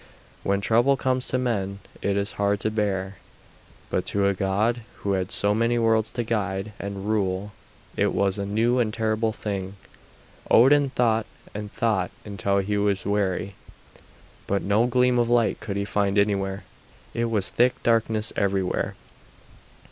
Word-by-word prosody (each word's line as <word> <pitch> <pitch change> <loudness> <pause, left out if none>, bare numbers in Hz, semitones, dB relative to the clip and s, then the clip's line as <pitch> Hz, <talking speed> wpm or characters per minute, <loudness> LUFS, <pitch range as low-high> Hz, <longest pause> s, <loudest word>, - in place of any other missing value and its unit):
When 100 0 0
trouble 120 +6 +3
comes 130 -1 0
to 130 - 0
men 100 -6 -1 0.2
it 100 0 0
is 100 +1 0
hard 100 0 +2
to 110 - 0
bear, 100 -3 -1 0.7
but - - 0
to 100 -1 +1
a 100 - +3
god 100 +5 0 0.2
who 100 - 0
had 95 -1 0
so 100 0 +2
many 115 +2 +1
worlds 115 -1 +2
to 120 - -1
guide 105 -2 -2
and 100 -1 -5
rule 100 -1 -1 0.4
it - - +2
was 100 0 0
a 100 - -2
new 115 +5 +2
and 110 -3 +1
terrible 110 0 0
thing. 100 -3 -4 0.7
Odin 140 +3 +6
thought 115 -3 +1 0.3
and 105 0 -6
thought 110 -6 0 0.2
until 100 -1 -1
he 100 +1 0
was 100 -2 0
weary, 100 -1 -1 0.9
but 100 0 0
no 105 +4 +2
gleam 125 0 +3
of 120 -1 +1
light 120 -2 +2
could 100 -2 -4
he 100 - -1
find 100 -1 0
anywhere; 100 -1 +1 0.5
it 115 - 0
was 110 -4 0
thick 125 +1 +3
darkness 115 -1 +2
everywhere. 95 -2 0
105 Hz, 155 wpm, -25 LUFS, 100-115 Hz, 0.9 s, Odin